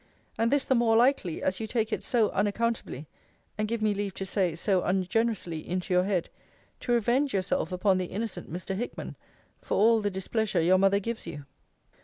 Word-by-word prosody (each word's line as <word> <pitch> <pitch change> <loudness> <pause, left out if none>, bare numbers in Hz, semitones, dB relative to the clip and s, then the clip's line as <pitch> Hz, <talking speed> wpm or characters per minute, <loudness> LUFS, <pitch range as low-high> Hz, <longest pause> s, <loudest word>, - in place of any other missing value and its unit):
And 225 +1 +1
this 285 +1 +2
the - - +2
more 235 -2 +3
likely, 235 - +2
as 190 0 0
you 220 - -3
take 220 0 -1
it - - -2
so 230 -4 +2
unaccountably 210 - -1 0.5
(and, 215 0 -1
give 225 0 -2
me 215 -1 +3
leave 200 -1 -3
to 195 - -4
say, 185 -4 0
so 185 +2 +1
ungenerously) 190 -2 0
into 180 +3 -3
your 180 0 +3
head, 190 -4 0 0.5
to - - -3
revenge 240 +3 +2
yourself 185 0 0
upon 185 +1 +2
the 185 - -1
innocent 215 0 -5
Mr. 180 +3 -4
Hickman, 240 +5 -5 0.5
for - - -2
all 225 +2 +5
the 205 - 0
displeasure 200 +1 -1
your 180 +3 +4
mother 195 +1 +4
gives 230 +3 -5
you. 145 -1 -7
205 Hz, 190 wpm, -28 LUFS, 185-230 Hz, 0.5 s, all